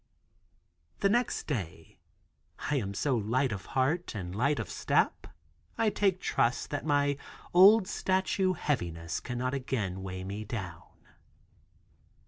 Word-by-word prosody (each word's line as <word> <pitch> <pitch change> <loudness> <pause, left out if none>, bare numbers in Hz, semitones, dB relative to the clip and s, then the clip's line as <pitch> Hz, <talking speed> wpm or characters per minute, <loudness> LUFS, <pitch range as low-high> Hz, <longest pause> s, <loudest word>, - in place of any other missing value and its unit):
The 200 - +4
next 240 +3 +1
day 100 - -5 0.7
I 145 - +2
am 100 -5 -3
so 135 +5 +1
light 120 +4 +1
of 100 -2 -5
heart 150 +4 +1
and 90 -3 -5
light 140 +8 +1
of - - -3
step, - - 0 0.5
I 225 -2 +2
take 195 -3 +1
trust 120 -9 0
that 145 +1 -3
my 145 -1 +2 0.4
old 195 +3 +7
statue 190 -1 +1
heaviness 85 - -2
cannot 125 +1 -3
again 110 -9 -2
weigh 95 -1 -5
me 100 +3 -5
down. 90 -6 -8
130 Hz, 125 wpm, -30 LUFS, -, 0.7 s, old